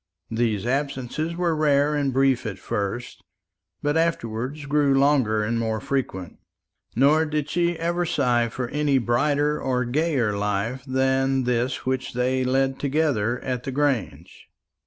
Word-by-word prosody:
These 110 -3 0
absences 140 +4 -2
were 170 -2 0
rare 145 -1 +2
and 145 -2 0
brief 130 -2 +2
at 100 -3 -5
first, 100 +5 -4 0.6
but 145 +1 +1
afterwards 145 -3 -1
grew 145 -1 +2
longer 130 -7 +3
and 115 +2 -1
more 110 -1 -1
frequent. 100 -11 -3 0.6
Nor 145 +6 +4
did 150 -1 -2
she 170 0 +1
ever 170 +2 -1
sigh 125 -8 +1
for 125 +2 -4
any 145 -1 +1
brighter 145 +5 +1
or 125 -1 0
gayer 130 -5 0
life 105 +5 -2
than 130 0 +1
this 125 +1 -1
which 130 0 -2
they 130 +1 0
led 135 +1 +1
together 135 -6 0
at 125 -2 -3
the 135 - -5
Grange. 135 -6 -2
130 Hz, 140 wpm, -24 LUFS, 120-145 Hz, 0.6 s, Nor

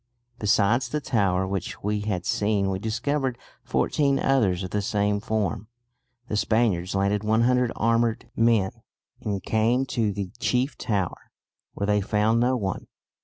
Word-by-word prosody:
Besides 110 +4 +2
the 150 - -1
tower 100 -9 +1
which 95 -2 -4
we 105 +1 0
had 100 -4 -3
seen 105 -4 +1
we 95 - -2
discovered 130 +4 -1 0.3
fourteen 140 -2 +1
others 105 -11 +2
of 90 - -6
the 105 - 0
same 105 0 0
form." 105 -2 -2 0.6
The 105 - -3
Spaniards 105 -4 +1
landed 100 +1 +1
100 120 +3 +2
armed 115 0 +1
men, 115 -5 +3 0.5
and 100 -2 -3
came 115 +4 +2
to 115 -5 0
the 95 -2 -4
chief 130 +2 0
tower, 100 -8 -3 0.5
where 100 - -2
they 105 0 +2
found 105 +3 +2
no 125 +2 +2
one. 95 -5 -3
105 Hz, 145 wpm, -25 LUFS, 100-120 Hz, 0.6 s, men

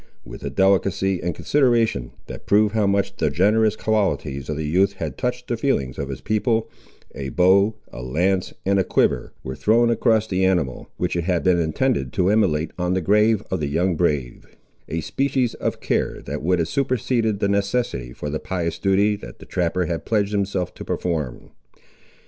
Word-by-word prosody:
With - - -10
a 70 - -2
delicacy 95 +3 +2
and 85 -2 -2
consideration, 120 - +1 0.2
that - - -10
proved 105 +1 +4
how 110 -2 +2
much 100 0 0
the - - +1
generous 105 +4 +3
qualities 100 -12 -1
of 75 - -2
the 80 - -3
youth 95 +5 +2
had 95 - -5
touched 125 0 -3
the 120 - -1
feelings 70 - -1
of 70 - -3
his 70 - -6
people, 110 +1 0 0.4
a 70 -1 -5
bow, 100 +6 +4 0.2
a - - -7
lance, 90 +9 0
and 100 +1 +3
a - - +3
quiver, - - +1
were 65 - -5
thrown 115 +2 +3
across 110 -2 +2
the 95 -3 -1
animal, 85 -9 0
which - - -1
it 85 -1 -1
had 90 -2 0
been 90 -2 +3
intended 80 - 0
to 95 +2 +2
immolate 85 -8 +1
on 90 +1 0
the - - +2
grave 105 +3 +3
of 95 - 0
the 75 - -1
young 85 +5 +1
brave; 75 -7 -1 0.4
a 80 - -2
species 130 - 0
of - - -3
care - - -1
that - - -5
would 90 +4 +2
have 85 -2 0
superseded 120 -2 0
the 100 - +1
necessity 100 - -1
for 75 +3 -6
the 75 - -2
pious 85 -3 -3
duty 100 +2 +2
that 80 -12 -11
the - - -13
trapper 90 0 -1
had 85 -1 -3
pledged 105 -2 0
himself 100 -3 -1
to - - -9
perform. 75 -9 -3
95 Hz, 190 wpm, -22 LUFS, 80-110 Hz, 0.4 s, proved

